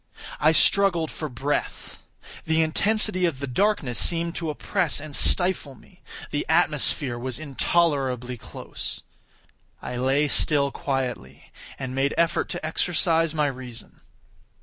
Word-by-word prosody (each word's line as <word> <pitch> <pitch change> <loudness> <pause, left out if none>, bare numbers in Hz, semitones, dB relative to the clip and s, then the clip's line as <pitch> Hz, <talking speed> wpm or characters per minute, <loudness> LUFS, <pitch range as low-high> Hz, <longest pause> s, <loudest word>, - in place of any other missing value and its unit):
I 155 - +5
struggled 170 -1 +3
for 155 - -5
breath. 135 +4 -4 0.4
The 160 0 +2
intensity 185 +3 +2
of 165 -6 -1
the 140 - -4
darkness 140 - 0
seemed 170 0 +3
to 165 -2 -3
oppress 165 +1 0
and 150 -1 -7
stifle 180 -7 +1
me. - - -21 0.3
The - - -1
atmosphere 120 -4 +1
was 125 -1 -4
intolerably 135 -4 0
close. 115 - -7 0.8
I 130 +4 0
still 145 0 +2
lay 140 - -3
quietly, 125 - -4 0.3
and 130 -1 -5
made 135 +1 0
effort 170 0 +1
to 175 -2 -5
exercise 165 0 +1
my 150 -1 +2
reason. 130 -4 -6
150 Hz, 125 wpm, -24 LUFS, 130-165 Hz, 0.8 s, I